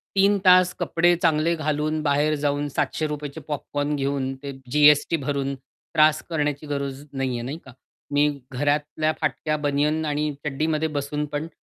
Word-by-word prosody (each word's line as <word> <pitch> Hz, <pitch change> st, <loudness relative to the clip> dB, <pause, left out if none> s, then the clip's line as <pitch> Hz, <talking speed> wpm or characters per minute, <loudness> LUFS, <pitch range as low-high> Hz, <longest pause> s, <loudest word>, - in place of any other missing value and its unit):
3 200 Hz, +1 st, +4 dB
तास 180 Hz, 0 st, +6 dB
कपडे 175 Hz, +1 st, +3 dB
चांगले 165 Hz, 0 st, +2 dB
घालून 155 Hz, 0 st, -1 dB
बाहेर 150 Hz, +1 st, +2 dB
जाऊन 145 Hz, 0 st, 0 dB
₹700 150 Hz, -2 st, -2 dB
चे 160 Hz, -, -9 dB
पॉपकॉर्न 145 Hz, 0 st, -2 dB
घेऊन 135 Hz, -1 st, -1 dB
ते 140 Hz, -, -4 dB, 0.2 s
जी-एस-टी 150 Hz, +2 st, +5 dB
भरून 140 Hz, -1 st, -1 dB
त्रास 155 Hz, +3 st, +1 dB
करण्याची 150 Hz, -2 st, -1 dB
गरज 140 Hz, -1 st, -4 dB
नाहीये. 130 Hz, -3 st, -2 dB
नाही 135 Hz, +6 st, -5 dB
का? 130 Hz, -, -12 dB, 0.4 s
मी 145 Hz, +1 st, +4 dB, 0.2 s
घरातल्या 145 Hz, +3 st, 0 dB
फाटक्या 155 Hz, 0 st, -1 dB
बनियन 150 Hz, +2 st, 0 dB
आणि 150 Hz, 0 st, -1 dB
चड्डीमध्ये 155 Hz, +2 st, 0 dB
बसून 150 Hz, +1 st, -2 dB
पण 150 Hz, +2 st, -2 dB
150 Hz, 145 wpm, -24 LUFS, 140-155 Hz, 0.4 s, तास